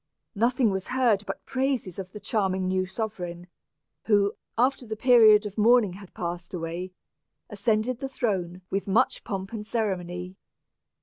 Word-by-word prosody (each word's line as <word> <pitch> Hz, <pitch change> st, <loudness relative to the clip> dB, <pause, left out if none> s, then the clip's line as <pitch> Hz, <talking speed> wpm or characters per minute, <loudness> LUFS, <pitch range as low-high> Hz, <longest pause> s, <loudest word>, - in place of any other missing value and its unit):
Nothing 235 Hz, +1 st, +2 dB
was 190 Hz, -1 st, -3 dB
heard 245 Hz, -6 st, +2 dB
but -, -, -6 dB
praises 260 Hz, -9 st, -1 dB
of 185 Hz, -1 st, -6 dB
the 210 Hz, -, -8 dB
charming 195 Hz, -3 st, 0 dB
new 185 Hz, 0 st, 0 dB
sovereign, 180 Hz, -4 st, -5 dB, 0.6 s
who, 205 Hz, -1 st, +3 dB, 0.2 s
after 255 Hz, +2 st, +2 dB
the 220 Hz, -2 st, -5 dB
period 220 Hz, -3 st, +6 dB
of 210 Hz, +1 st, -5 dB
mourning 225 Hz, -3 st, +5 dB
had 195 Hz, 0 st, -13 dB
passed 175 Hz, +1 st, -5 dB
away, 170 Hz, +2 st, -4 dB, 0.6 s
ascended 215 Hz, +4 st, 0 dB
the 270 Hz, -1 st, -4 dB
throne 185 Hz, -8 st, -2 dB
with 195 Hz, +1 st, -1 dB
much 225 Hz, +7 st, +2 dB
pomp 195 Hz, -1 st, -5 dB
and 215 Hz, -2 st, -4 dB
ceremony. 185 Hz, -5 st, -3 dB
205 Hz, 145 wpm, -26 LUFS, 185-230 Hz, 0.6 s, period